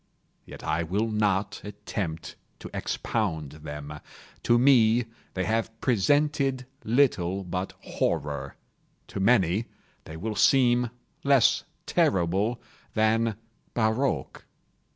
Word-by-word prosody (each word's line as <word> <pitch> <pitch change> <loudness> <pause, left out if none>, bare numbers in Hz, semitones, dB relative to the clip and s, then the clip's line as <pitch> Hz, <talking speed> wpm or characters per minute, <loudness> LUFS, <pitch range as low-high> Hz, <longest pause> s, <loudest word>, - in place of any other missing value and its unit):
Yet - - -10
I 80 +1 0
will 100 +7 -1
not 105 -2 0
attempt 100 -5 -5 0.2
to - - -10
expound 80 -10 -2
them. 75 -1 -8 0.4
To 120 - +4
me, 120 -2 +5 0.3
they 95 - 0
have 115 +1 -1
presented 135 +2 +2 0.2
little 100 -7 +2
but 90 +1 -4
horror—to 70 +6 -4
many 100 -1 +3 0.4
they 80 - -8
will 105 +5 -3
seem 125 +1 +4 0.3
less 140 -4 +4 0.2
terrible 95 +6 +1 0.4
than 110 0 +2 0.4
barroques. 110 - 0
105 Hz, 95 wpm, -27 LUFS, 85-120 Hz, 0.4 s, me